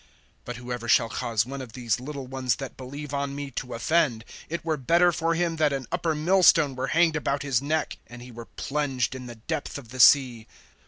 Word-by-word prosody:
(6)But 125 - -4
whoever 120 -1 -6
shall 115 -1 +4
cause 115 -1 -1
one 135 +2 -6
of 120 -4 -10
these 120 -4 -1
little 140 +1 -6
ones 130 -2 -1
that 135 -2 -7
believe 140 +3 -8
on 140 0 -2
me 140 -1 -5
to 125 0 -5
offend, 120 -3 +1 0.2
it 170 +1 -4
were 160 -1 +1
better 170 +6 +3
for 165 0 0
him 170 -1 0
that 155 -2 +3
an 135 -2 -3
upper 160 -2 0
millstone 165 -3 +4
were 130 +1 -2
hanged 165 -1 +3
about 145 -2 -1
his 135 -4 +1
neck, 155 +2 -1
and 120 0 -11
he 125 - -11
were 115 0 -9
plunged 135 -4 -2
in 130 -1 -8
the 120 - -8
depth 145 +8 -4
of 130 -5 -11
the 130 +2 -9
sea. 125 -4 +5
135 Hz, 215 wpm, -26 LUFS, 125-155 Hz, 0.2 s, sea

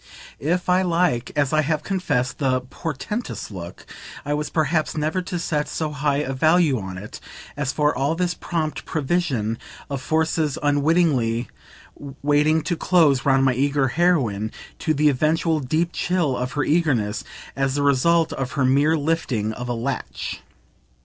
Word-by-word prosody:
If 175 +5 -1
I 180 +1 +4
like, 170 -9 +1
as 145 -2 +1
I 155 - +4
have 155 0 -1
confessed, 135 -10 -1
the 130 -3 +1
"portentous" 160 - -5
look, 90 -2 -8 0.4
I 145 - -1
was 150 0 -2
perhaps 155 0 0
never 155 +4 0
to 180 0 -4
set 150 -3 -1
so 155 -2 -3
high 145 0 0
a 135 - -3
value 155 -1 +3
on 95 -2 -6
it 105 +3 -9 0.4
as 145 -2 -1
for 150 +1 +1
all 140 +5 0
this 175 0 0
prompt 160 -2 -3
provision 135 -8 -1 0.3
of 135 -2 -2
forces 160 0 0
unwittingly 145 -6 +2 0.7
waiting 150 +2 +3
to 175 - -1
close 160 -7 +3
round 135 0 +4
my 130 - +3
eager 140 +1 +1
heroine 125 - +1 0.3
(to 155 -2 0
the 150 +2 +3
eventual 155 +3 +2
deep 155 +5 0
chill 175 -7 0
of 125 +1 -3
her 145 - 0
eagerness) 135 -10 +1 0.3
as 135 0 0
the 145 - 0
result 160 +4 +3
of 130 -2 -4
her 140 -3 +1
mere 145 +5 +3
lifting 140 -8 -1
of 125 +2 -6
a - - 0
latch. 125 +2 -4
145 Hz, 160 wpm, -23 LUFS, 130-160 Hz, 0.7 s, I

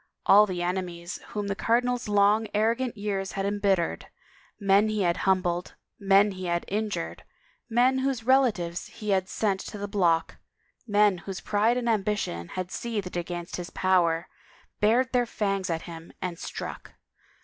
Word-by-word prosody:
All 210 +2 +7
the 180 -2 -3
enemies 175 -1 -3
whom 210 -1 -4
the 200 - -1
cardinal's 245 +3 0
long, 205 +2 +3
arrogant 230 +3 +1
years 200 -2 -3
had 195 0 -2
embittered, 200 -4 0 0.5
men 200 +1 +4
he 215 -2 0
had 170 -1 +2
himibled, 180 -2 +1 0.3
men 200 +1 +4
he 185 -1 -6
had 170 0 0
in 215 +2 -1
jured, 85 - -4 0.5
men 250 +3 +3
whose 260 -3 -1
relatives 225 -10 +2
he 210 -1 -5
had 190 -1 +1
sent 200 -3 0
to 210 - -7
the 205 0 -4
block, 175 -5 +1 0.5
men 205 -3 +3
whose 190 +1 -6
pride 215 +4 +1
and 245 -1 -2
ambition 205 - -1
had 185 - -5
seethed 210 -7 -4
against 175 0 -4
his 175 -1 -6
power, 175 -3 +2 0.5
bared 245 +5 +3
their 245 -1 +2
fangs 195 -4 -1
at 165 -1 -2
him 165 -1 -10
and 175 -2 -4
struck. - - -7
200 Hz, 160 wpm, -27 LUFS, 180-215 Hz, 0.5 s, All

